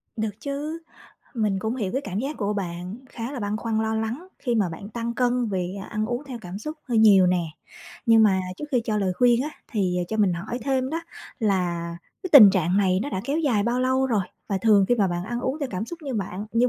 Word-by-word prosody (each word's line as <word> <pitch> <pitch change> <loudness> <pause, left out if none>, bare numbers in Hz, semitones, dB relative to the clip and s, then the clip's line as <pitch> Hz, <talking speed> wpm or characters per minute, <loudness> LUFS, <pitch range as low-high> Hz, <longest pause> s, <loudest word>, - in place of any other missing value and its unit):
Được 215 -1 -3
chứ, 295 +3 -4 0.6
mình 210 -5 0
cũng 220 +6 -2
hiểu 205 -7 -2
cái 265 - 0
cảm 200 -4 -4
giác 275 +6 -3
của 205 -1 -1
bạn 180 0 -4
khá 235 +3 -5
là 265 - -5
băn 205 0 -1
khoăn 220 0 -1
lo 220 0 -1
lắng 230 +11 -3
khi 245 -3 -1
mà 210 -5 +2
bạn 170 +5 -8
tăng 235 +1 -4
cân 245 -1 +1
vì 185 -1 -2
ăn 215 0 -1
uống 240 +4 -3
theo 260 -4 -7
cảm 185 -1 -7
xúc 305 +8 -6
hơi 235 -2 +2
nhiều 200 -4 +7
nè, 180 -1 +2 0.6
nhưng 225 -1 +6
mà 195 -3 +4 0.2
trước - - -5
khi 250 -4 +2
cho 215 -2 0
lời 195 -3 +1
khuyên 245 0 +4
á 300 - -4 0.2
thì 190 -5 0
cho 220 - -2
mình 205 -4 +3
hỏi 195 +8 -4
thêm 265 -1 0
đó 325 +2 -2 0.4
là 175 -6 0 0.3
cái 370 - -5
tình 225 -9 +11
trạng 185 -1 +1
này 190 -2 +3
nó 285 - -3
đã 185 - -2
kéo 285 +3 0
dài 260 -10 +2
bao 240 +3 0
lâu 260 +1 +2
rồi? 220 -6 +1 0.3
Và 195 -2 0
thường 205 -1 +5
khi 245 - +4
mà 205 -5 +2
bạn 175 0 -3
ăn 240 +4 -3
uống 260 +4 -2
theo 280 - -2
cảm 185 +3 -2
xúc 345 - -7
như 275 -4 -4
bạn 200 -1 -4
như 240 +2 +3
220 Hz, 250 wpm, -25 LUFS, 195-250 Hz, 0.6 s, tình